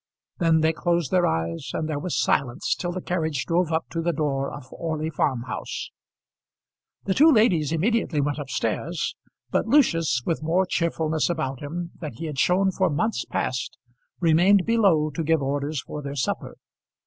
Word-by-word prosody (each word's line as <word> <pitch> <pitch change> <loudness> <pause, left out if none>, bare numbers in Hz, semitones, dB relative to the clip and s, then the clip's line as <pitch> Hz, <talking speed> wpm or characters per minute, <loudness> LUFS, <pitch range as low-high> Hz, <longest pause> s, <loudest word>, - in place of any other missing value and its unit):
Then 165 -2 +3
they 160 +1 +3
closed 170 -3 0
their 185 -1 +3
eyes 85 +7 -2
and 155 - -1
there 150 -2 -2
was 180 +2 -2
silence 125 -4 +1
till 175 - -3
the 185 0 -5
carriage 160 -6 -1
drove 170 -1 +1
up 160 0 0
to 165 - -2
the 170 +1 +1
door 140 -3 -1
of 145 - -8
Orley 160 -1 -3
Farm 130 -5 0
House. 125 - -5 1.1
The 195 - 0
two 310 +9 +6
ladies 185 - +3
immediately 180 -1 +1
went 145 +1 0
up 140 -2 -6
stairs, 130 +8 -2 0.4
but - - +1
Lucius, 165 - +3
with 165 - -1
more 170 +4 +2
cheerfulness 160 -3 0
about 135 -6 -2
him 170 +4 -5
than 155 -7 -6
he 145 +9 -7
had 150 -4 -4
shown 190 +2 +3
for 185 -1 +1
months 215 +10 -1
past, 125 -2 -3 0.4
remained 180 +4 +4
below 190 -10 +3
to 155 +4 -3
give 160 -2 +2
orders 140 +1 -2
for 150 - -6
their 140 0 -5
supper. 130 -3 -2
160 Hz, 175 wpm, -25 LUFS, 145-175 Hz, 1.1 s, two